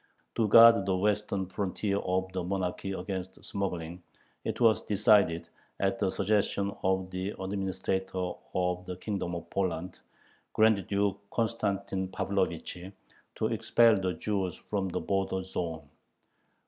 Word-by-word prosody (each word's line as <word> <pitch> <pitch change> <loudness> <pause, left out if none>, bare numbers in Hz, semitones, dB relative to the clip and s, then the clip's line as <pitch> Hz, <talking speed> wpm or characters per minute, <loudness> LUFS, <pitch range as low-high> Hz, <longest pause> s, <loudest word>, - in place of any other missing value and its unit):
To 110 - +1
guard 115 -2 +8
the 95 -1 +2
western 105 0 0
frontier 100 +2 -2
of 95 0 -1
the 90 -1 -2
monarchy 95 +1 -2
against 95 0 -5
smuggling, 90 -3 -3 0.4
it - - -3
was 115 -2 +4
decided, 100 -5 +3 0.3
at 95 0 0
the 100 - +2
suggestion 100 0 0
of 95 0 0
the 95 +2 -3
Administrator 95 -1 -2 0.2
of 90 0 0
the 90 -1 -5
Kingdom 95 -3 -3
of 85 - -6
Poland, 90 -2 -2 0.5
Grand 110 -4 +3
Duke 100 -1 0
Constantine 100 -4 -1
Pavlovich, 90 -1 -2 0.6
to - - -1
expel 115 -2 +4
the 95 -2 -1
Jews 95 +1 -2
from 100 -2 -3
the - - -2
border 95 -1 -1
zone. 80 -5 -4
95 Hz, 130 wpm, -30 LUFS, 90-100 Hz, 0.6 s, guard